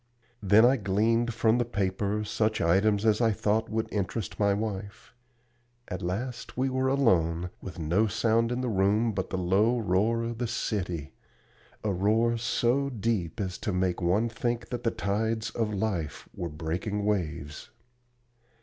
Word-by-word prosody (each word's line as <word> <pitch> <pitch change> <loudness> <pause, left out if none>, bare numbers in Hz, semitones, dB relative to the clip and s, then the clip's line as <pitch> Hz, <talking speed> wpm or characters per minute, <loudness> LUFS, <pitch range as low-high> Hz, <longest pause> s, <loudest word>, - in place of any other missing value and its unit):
Then 105 +3 +6
I 130 +2 +5
gleaned 115 +3 +1
from 115 +1 +2
the - - +3
paper 100 -1 -1
such 110 +1 0
items 100 +5 +2
as 110 +1 +3
I 115 - +4
thought 110 +2 0
would 110 0 -1
interest 100 +1 -3
my 100 -1 +3
wife. 100 -1 -4 0.8
At 90 - -4
last 120 +10 -4
we 130 +1 +1
were 130 0 +1
alone, 90 -11 +2
with 95 0 -8
no 85 +7 +1
sound 115 +3 +1
in 125 +1 -1
the 130 - -1
room 105 +2 +2
but 95 -2 -3
the 95 - -2
low 100 +7 +2
roar 110 +2 +1
of 115 0 -4
the 120 - -1
city, 90 -9 -3 0.7
a 105 - 0
roar 110 +5 +2
so 120 +4 +1
deep 110 -6 -2
as 95 -3 -3
to 110 -2 -2
make 90 -1 0
one 95 +7 +2
think 120 +1 -3
that 120 -1 -4
the 115 - +3
tides 110 +2 -1
of 110 -2 -1
life 95 -7 -3
were 85 - -4
breaking 85 +7 -3
waves. 80 -7 -2
105 Hz, 160 wpm, -28 LUFS, 95-115 Hz, 0.8 s, Then